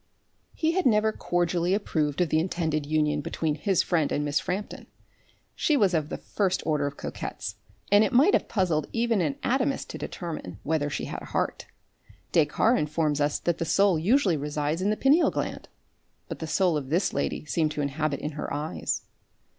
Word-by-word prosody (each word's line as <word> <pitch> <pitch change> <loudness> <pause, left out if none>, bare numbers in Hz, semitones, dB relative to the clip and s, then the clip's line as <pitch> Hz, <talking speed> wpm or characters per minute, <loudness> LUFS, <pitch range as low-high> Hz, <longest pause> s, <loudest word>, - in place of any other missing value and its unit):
He 320 0 +1
had 365 -3 +2
never 220 -1 +3
cordially 175 -1 0
approved 155 -6 -1
of 175 - +2
the 155 - +3
intended 160 -4 -1
union 150 -1 +1
between 155 +1 -1
his 185 +5 +1
friend 160 -5 +1
and 145 - 0
Miss 145 0 +1
Frampton. 195 +3 -4 0.7
She 300 - +2
was 200 -7 +3
of 155 -2 0
the - - -4
first 190 -3 -1
order 150 -2 +1
of 140 - -7
coquettes, - - -5 0.3
and 205 +1 +7
it 215 - 0
might 280 - +5
have - - +2
puzzled 170 -7 0
even 230 -3 +1
an 150 -5 0
anatomist 265 +2 0
to - - -7
determine, 160 - -6
whether 150 -1 0
she - - -3
had - - -6
a - - -9
heart. - - -2 0.6
Descartes 170 +9 +3
informs 150 -1 0
us 145 0 +1
that 170 -1 -1
the - - 0
soul 180 +1 +3
usually 195 - +3
resides 150 +3 -2
in 195 - +1
the 215 - 0
pineal 290 +6 +4
gland, - - -4 0.6
but - - -6
the 160 - -4
soul 175 -1 +2
of 135 -3 -5
this 175 +5 +1
lady - - -2
seemed 155 0 +1
to 150 - -2
inhabit 140 0 -1
in 150 - -3
her 150 0 -5
eyes. 150 +2 -2
165 Hz, 190 wpm, -27 LUFS, 150-200 Hz, 0.7 s, and